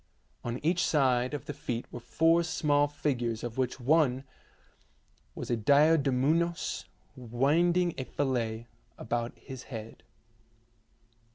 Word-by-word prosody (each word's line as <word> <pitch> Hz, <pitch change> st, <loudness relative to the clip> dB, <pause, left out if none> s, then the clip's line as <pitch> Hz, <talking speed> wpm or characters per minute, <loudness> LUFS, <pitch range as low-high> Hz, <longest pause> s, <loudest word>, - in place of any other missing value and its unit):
On 120 Hz, 0 st, -3 dB
each 175 Hz, +2 st, +2 dB
side 130 Hz, -2 st, +2 dB
of 145 Hz, -, -7 dB
the -, -, -5 dB
feet 120 Hz, -1 st, -4 dB
were 120 Hz, -, -6 dB
four 165 Hz, +7 st, +3 dB
small 145 Hz, -3 st, +2 dB
figures 120 Hz, -6 st, -2 dB
of 120 Hz, +1 st, -5 dB
which 130 Hz, 0 st, -1 dB
one 135 Hz, -1 st, +2 dB, 1.1 s
was -, -, -5 dB
a -, -, +3 dB
diadumenos 145 Hz, +5 st, +2 dB, 0.3 s
winding 155 Hz, +9 st, +1 dB
a 130 Hz, -, -3 dB
fillet 115 Hz, -6 st, -2 dB, 0.3 s
about 120 Hz, 0 st, -3 dB
his 130 Hz, -1 st, -10 dB
head. 115 Hz, -3 st, -8 dB
135 Hz, 115 wpm, -29 LUFS, 120-155 Hz, 1.1 s, four